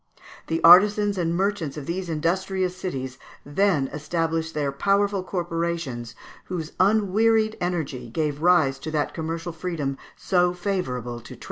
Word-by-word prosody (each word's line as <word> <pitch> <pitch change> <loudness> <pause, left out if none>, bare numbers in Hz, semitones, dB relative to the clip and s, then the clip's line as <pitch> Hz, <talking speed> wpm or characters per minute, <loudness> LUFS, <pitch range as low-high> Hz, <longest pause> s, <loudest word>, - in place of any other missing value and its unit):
The 165 0 -2
artizans 205 +4 +7
and 170 -1 0
merchants 190 -6 -1
of 145 - -6
these 175 +2 -3
industrious 185 +3 -1
cities 130 -9 -5 0.3
then 150 -2 +1
established 160 +1 -2
their 145 -2 0
powerful 200 +6 +1
corporations, 165 -9 -3 0.3
whose 170 -3 -5
unwearied 220 +2 +3
energy 150 -9 -3
gave 150 +2 -2
rise 160 -6 +4
to 155 - -6
that 155 -2 -1
commercial 165 +1 -4
freedom 160 -5 -3 0.2
so 180 -1 +1
favourable 130 - -3
to - - -11
trade. - - -21
170 Hz, 135 wpm, -24 LUFS, 150-190 Hz, 0.3 s, artizans